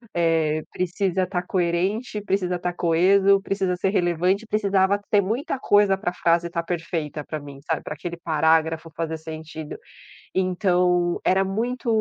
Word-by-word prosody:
eh, 160 -2 +2
precisa 185 +1 -1
estar 180 -1 -2
coerente, 190 +6 -1
precisa 190 -3 0
estar 180 0 -3
coeso, 190 +4 +4
precisa 195 -2 -1
ser 185 +2 0
relevante.", 180 +3 +1
precisava 200 -2 +2
ter 205 - +5
muita 235 +7 -2
coisa 205 -3 +4
para 190 -1 -2
a - - -7
frase 170 -1 +2
estar 170 -1 -3
perfeita 165 -3 -3
para 155 +1 -5
mim, 140 -1 -11
sabe, 160 - 0
para - - -5
aquele 170 +3 -6
parágrafo 160 0 +1
fazer 160 -1 -3
sentido. 160 -1 -8 0.6
Então, 180 -2 +1
era 190 +1 +3
muito 235 +6 -3
180 Hz, 150 wpm, -23 LUFS, 165-195 Hz, 0.6 s, ter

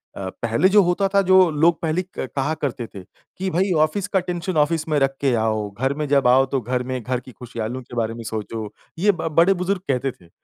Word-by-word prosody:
अ, 95 -1 -5
पहले 115 +11 +2
जो 205 +1 +6
होता 180 +3 +1
था, 200 - +5
जो 185 -1 +5
लोग 160 +2 +3
पहले 165 +2 0 0.2
क - - -3
कहा 140 +3 0
करते 125 -3 -2
थे 95 -2 -11
कि, 190 - -8
भई 185 +2 +1
ऑफ़िस 180 +6 -1
का 195 -1 +1
टेंशन 175 -1 -3
ऑफ़िस 160 +1 -2
में 150 - +2
रख 135 0 +1
के 135 -3 +2
आओ। 110 -2 -1
घर 130 +7 -1
में 150 - -1
जाओ 135 -2 +4
तो 135 0 -1
घर 125 +2 -2
में 130 -1 -2
घर 125 +2 -2
की 130 +1 -13
खुशियाँ, 115 -3 -6
लोगों 130 +2 -5
के 120 - -11
बारे 115 -1 0
में 115 0 -8
सोचो, 110 0 -5 0.3
ये 205 +2 +4
ब 175 - -4
बड़े 180 +4 +6
बुज़ुर्ग 180 +1 -2
कहते 135 0 0
थे। 85 - -19
140 Hz, 240 wpm, -22 LUFS, 120-175 Hz, 0.3 s, जो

